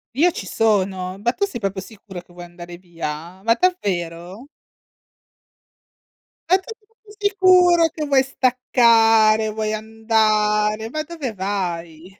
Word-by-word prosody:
Io 340 +6 +4
ci 190 - -7
sono, 190 -3 -1
ma 240 - +2
tu 400 - -1
sei 315 - -8
proprio 195 -1 -3
sicuro 195 -3 -11
che 175 0 -18
vuoi 175 0 -10
andare 175 0 -11
via? 170 0 -8
Ma 230 0 +3
davvero? 190 - -3 2.0
Ma 370 - +6
tu 385 +4 -12
sei 435 -2 -36
proprio 435 -2 -20
sicuro 365 -4 +4
che 305 0 -5
vuoi 275 -2 +3
staccare, 225 -4 +3
vuoi 215 0 -3
andare? 215 -1 0
Ma 310 +3 -4
dove 300 -8 -6
vai! 180 -2 -5
215 Hz, 135 wpm, -20 LUFS, 185-265 Hz, 2.0 s, Ma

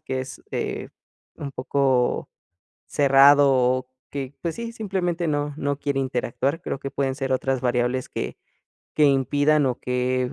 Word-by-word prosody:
que 130 -1 -4
es, 130 - -8
eh, - - -3 0.5
un 140 -2 -6
poco 130 -1 +1 0.6
cerrado 140 0 +6
o 130 0 +2 0.2
que, 140 -1 -5
pues 170 -2 -2
sí, 235 0 -5
simplemente 185 -5 -2
no 145 -1 -1
no 145 -1 -2
quiere 140 -1 -1
interactuar, 130 +3 -1
creo - - -4
que 135 - -5
pueden 135 -1 -1
ser 135 -2 -3
otras 130 0 0
variables 125 +1 0
que 60 - -4 0.6
que 150 - +4
impidan 145 +2 +3
o 125 -2 -1
que 125 0 -1
135 Hz, 150 wpm, -24 LUFS, 130-145 Hz, 0.6 s, cerrado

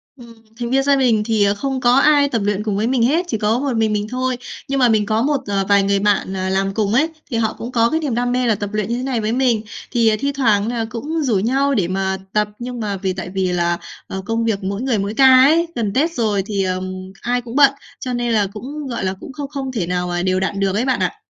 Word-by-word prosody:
Ừm, 235 -3 -13 0.3
thành 240 -1 -3
viên 270 +2 +2
gia 280 0 +4
đình 240 -6 +2
thì, 220 -2 +2
ờ, 200 0 +3
không 265 +5 -3
có 245 0 +4
ai 285 +1 +4
tập 230 -5 -1
luyện 205 0 0
cùng 210 -2 -1
với 215 +2 0
mình 250 -2 +1
hết, 315 +9 +2
chỉ 225 - -1
có 215 +2 +1
một 275 -1 -1
mình 220 -1 +1
mình 210 0 -1
thôi. 255 +1 -1 0.3
Nhưng 275 0 -1
mà 250 -2 +5
mình 215 -2 +2
có 215 +2 0
một, 285 +3 +2
ờ, 195 -1 0
vài 200 -1 +5
người 200 0 +1
bạn, 200 -1 +1
ờ, 190 0 -2
làm 195 +1 0
cùng 210 -1 0
ấy, 305 +7 +3 0.2
thì 230 - 0
họ 220 -1 0
cũng 235 - -6
có 230 -1 +3
cái 320 - 0
niềm 285 -7 -2
đam 245 +1 0
mê 250 0 +1
là 225 - +3
tập 205 0 -4
luyện 215 -1 -1
như 235 - -1
thế 250 - -4
này 260 -4 -1
với 215 +1 -1
mình. 245 -3 +2 0.3
Thì, 235 -3 +3
ờ, 215 - +2
thi 280 +4 0
thoảng 220 -7 +2
là 235 -1 -1
cũng 295 +8 -3
rủ 245 -6 +1
nhau 270 +7 +1
để 195 -9 +1
mà 190 +1 -1 0.2
tập, 210 0 +2
nhưng 245 0 -5
mà 205 -3 -2
vì 190 -1 -2
tại 185 -1 -6
vì 190 -1 -1
là, 175 -1 0 0.3
ờ, 190 - -5
công 230 +1 -1
việc 215 -3 -1
mỗi 200 +3 -3
người 255 -4 0
mỗi 200 +1 -2
ca 265 +4 +4 0.2
ấy, 325 +5 +4
gần 210 -4 -1
Tết 305 +7 +2
rồi 215 - 0
thì, 200 -2 -1
ờm, 185 0 -2 0.3
ai 245 +1 0
cũng 235 0 -9
bận, 280 -1 +7 0.3
cho 255 - -4
nên 240 -1 -1
là 210 -2 +2
cũng, 280 +7 -6
gọi 235 -5 -4
là, 185 - 0
cũng - - -9
không 285 -1 -6
không 275 -2 -4
thể 210 -9 -2
nào 180 0 -1
mà 175 0 -2
đều 185 0 +1
đặn 195 +1 -2
được 195 -1 0
ấy 230 +4 0
bạn 260 - +1
ạ. - - -1
225 Hz, 285 wpm, -19 LUFS, 200-260 Hz, 0.3 s, bận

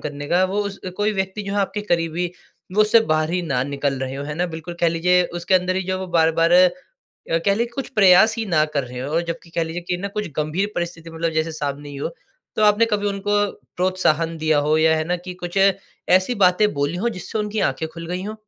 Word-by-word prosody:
करने 145 -1 -6
का 180 +2 +3
वो 195 +2 -1
उस 200 -1 -5 0.2
कोई 210 +1 +1
व्यक्ति 190 +1 -3
जो 200 - -5
है - - 0
आपके 205 +1 -2
करीबी 170 +1 0 0.4
वो 215 - +3
उससे 215 +2 +6
बाहर 155 +1 0
ही 180 0 -1
ना 135 -6 0
निकल 140 -1 -2
रहे 130 0 -3
हों 140 +1 -5
है 150 - -4
ना। 175 +3 0
बिल्कुल 165 +1 -7
कह 170 - +4
लीजिए 180 +2 +3 0.2
उसके 185 +2 +1
अंदर 185 0 +2
ही 190 - 0
जो 185 0 -2
वो 190 - -5
बार-बार 165 0 +2
अ, 180 0 +7 0.8
कह 200 - +4
लें 235 +3 0
कुछ 270 - -4
प्रयास 200 +1 +6
ही 225 - -2
ना 155 -5 +3
कर 140 - +1
रहे 125 0 -7
हों 150 +6 -1
जबकि 170 0 -6
कह 165 - -1
लीजिए 165 +2 -5
कि 180 - 0
ना 195 +3 -4
कुछ 210 -1 -2
गंभीर 165 +7 -1
परिस्थिति 170 -1 -4
मतलब 165 0 -2
जैसे 160 +1 -1
सामने 145 -1 -4
ही 140 - -8
हो। 140 - -3 0.5
तो - - +1
आपने 210 +2 +5
कभी 205 -2 -1
उनको 200 +1 -1 0.4
प्रोत्साहन 170 -3 +1
दिया 155 -1 +2
हो? 150 +2 +2
या 160 0 +4
है 155 - -1
ना 180 +2 -1
कि 180 +1 -8
कुछ 175 +2 -2 0.5
ऐसी 185 +6 +3
बातें 185 +4 +3
बोली 145 +4 -1
हो - - +3
जिससे 220 0 -5
उनकी 210 0 -2
आँखें 135 +4 -3
खुल 165 +1 -9
गई 180 +2 -3
हों? 210 +2 -5
175 Hz, 240 wpm, -21 LUFS, 155-195 Hz, 0.8 s, अ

